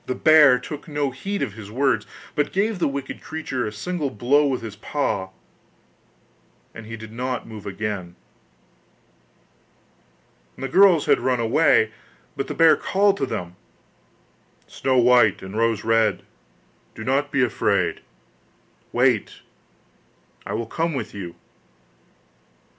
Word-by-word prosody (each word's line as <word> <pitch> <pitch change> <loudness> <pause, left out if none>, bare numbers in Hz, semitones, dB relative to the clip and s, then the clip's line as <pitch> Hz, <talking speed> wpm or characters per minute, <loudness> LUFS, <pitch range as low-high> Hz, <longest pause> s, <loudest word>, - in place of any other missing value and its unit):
The 130 - -2
bear 150 -5 +6
took 145 +4 -8
no 145 -3 -1
heed 195 +10 -4
of 105 - -4
his 105 -2 -10
words, 135 +5 0 0.3
but 150 - 0
gave 205 +1 0
the - - +2
wicked 140 -1 -5
creature 135 -7 -4
a - - -4
single 155 +7 -3
blow 135 +7 +2
with 130 -3 -2
his 110 -2 -7
paw, 100 -5 -2 1.4
and 115 -1 -10
he 115 0 -7
did 110 -1 -10
not 125 +1 -4
move 110 -3 -9
again. 100 -3 -4 2.4
The 135 - -4
girls 180 +1 +5
had - - +3
run 130 -2 0
away, 115 -1 +3 0.4
but 135 - -3
the - - -5
bear 165 -2 +6
called 195 +5 +2
to 135 - -1
them: 90 -6 -5 1.1
'Snow 130 -1 -1
white 120 -5 +4
and 95 +2 -8
Rose 115 -2 +1
red, 115 -1 +2 0.7
do 110 - -7
not 140 +4 0
be 140 - +2
afraid; 120 - 0 0.9
wait, - - +1 1.1
I - - -4
will 115 +1 -2
come 165 +6 -2
with 130 - -5
you. 90 -4 -7
125 Hz, 135 wpm, -23 LUFS, 110-145 Hz, 2.4 s, bear